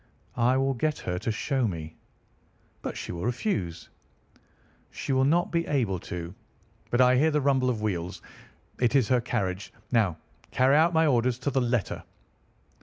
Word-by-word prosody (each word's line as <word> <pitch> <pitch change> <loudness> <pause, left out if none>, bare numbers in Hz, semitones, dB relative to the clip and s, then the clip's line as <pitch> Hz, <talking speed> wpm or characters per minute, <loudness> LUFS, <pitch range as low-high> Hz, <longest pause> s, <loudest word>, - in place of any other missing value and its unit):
"I 125 +2 +3
will 135 0 +1
get 150 +5 -1
her 90 0 -3
to 115 - -2
show 130 +3 0
me." 80 -4 -6 0.9
"But - - -5
she - - -5
will 85 0 -5
refuse." 110 - -2 1.0
"She 135 - -3
will 130 0 +3
not 170 +5 +2
be 170 0 0
able 115 -11 0
to. 85 0 -6 0.6
But 120 - +3
I 125 0 +6
hear 155 +4 +4
the 150 -1 +1
rumble 135 -2 +2
of 110 -4 -2
wheels. 90 -4 -2 0.6
It 125 +2 +2
is 130 -6 +3
her 125 -1 +3
carriage. 100 -5 -2 0.2
Now 105 -9 +2 0.3
carry 130 +2 +3
out 160 +3 +5
my 160 0 +4
orders 125 -4 +2
to 140 - -2
the 135 - +1
letter." 120 -3 -1
125 Hz, 170 wpm, -27 LUFS, 100-135 Hz, 1.0 s, I